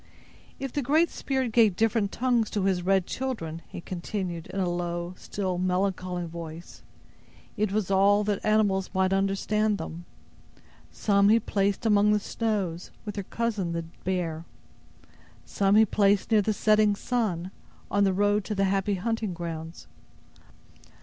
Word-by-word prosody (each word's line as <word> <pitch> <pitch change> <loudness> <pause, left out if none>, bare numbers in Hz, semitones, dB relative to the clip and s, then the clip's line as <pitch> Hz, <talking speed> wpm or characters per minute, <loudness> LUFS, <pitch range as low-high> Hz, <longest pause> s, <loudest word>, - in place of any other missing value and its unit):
"If 270 -2 -5
the 290 - 0
Great 310 +6 +2
Spirit 265 -3 -2
gave 220 -4 +4
different 220 -1 +1
tongues 240 -3 +1
to 205 - -1
his 190 -2 +1
red 190 0 +2
children," 175 -13 -4
he - - -8
continued, 175 -1 -4
in 195 - -5
a 185 - +1
low, 175 0 -3
still 185 -1 -3
melancholy 185 -1 -1
voice, 165 0 -9 0.7
"it 210 -1 0
was 205 -2 -1
that - - +1
all 200 +2 +4 0.2
animals 205 -3 +2
might 190 0 +2
understand 200 +2 +1
them. 170 -2 -7 0.9
Some 200 -1 +3
He 225 +2 +6
placed 200 -1 -1
among 210 -1 +4
the 210 - +2
snows, 200 -6 -2 0.2
with 210 - -4
their 200 - -4
cousin, 215 -7 -2
the 170 0 -2 0.2
bear. 170 -4 -2 1.0
Some 200 0 +2
he 220 +1 +7
placed 200 0 +2
near 215 -1 +5
the 215 - 0
setting 215 0 +3
sun, 200 -7 -2 0.4
on 205 0 +3
the 195 - +3
road 205 +2 +2
to 210 - -3
the 195 - +1
happy 195 +1 +1
hunting 215 -1 -2
grounds. 165 -1 -6
195 Hz, 150 wpm, -27 LUFS, 180-215 Hz, 1.0 s, he